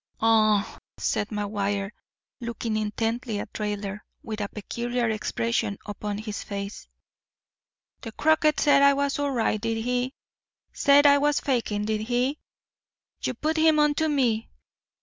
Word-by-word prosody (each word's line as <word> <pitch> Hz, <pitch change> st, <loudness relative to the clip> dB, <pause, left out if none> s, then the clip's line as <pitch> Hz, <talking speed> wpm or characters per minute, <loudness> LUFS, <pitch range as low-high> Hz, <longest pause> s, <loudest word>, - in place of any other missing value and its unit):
"Aw," 215 Hz, -2 st, +3 dB, 0.2 s
said 205 Hz, -, -1 dB
McGuire, 205 Hz, -1 st, -2 dB, 0.5 s
looking 235 Hz, -2 st, -3 dB
intently 225 Hz, +1 st, -2 dB
at -, -, -6 dB
Raidler, 205 Hz, -1 st, -3 dB, 0.2 s
with 215 Hz, -1 st, -5 dB
a 200 Hz, -, -2 dB
peculiar 240 Hz, +3 st, -2 dB
expression 220 Hz, -1 st, -1 dB
upon 205 Hz, 0 st, -4 dB
his 215 Hz, -1 st, -5 dB
face, 200 Hz, 0 st, -6 dB, 1.1 s
"the 225 Hz, -, -7 dB
croaker 315 Hz, +4 st, +3 dB
said 285 Hz, -2 st, +5 dB
I 280 Hz, 0 st, +6 dB
was 280 Hz, 0 st, 0 dB
all 285 Hz, 0 st, 0 dB
right, 225 Hz, -5 st, 0 dB
did 225 Hz, 0 st, -1 dB
he? 250 Hz, +2 st, -1 dB, 0.6 s
Said 285 Hz, +1 st, +5 dB
I 285 Hz, 0 st, +7 dB
was 295 Hz, 0 st, +2 dB
fakin', 225 Hz, -6 st, -1 dB
did 215 Hz, 0 st, -1 dB
he? 250 Hz, +6 st, 0 dB, 0.8 s
You -, -, -2 dB
put 315 Hz, +1 st, -1 dB
him 315 Hz, -1 st, +4 dB
onto 300 Hz, +1 st, +3 dB
me. 245 Hz, -7 st, +1 dB
225 Hz, 135 wpm, -26 LUFS, 210-280 Hz, 1.1 s, I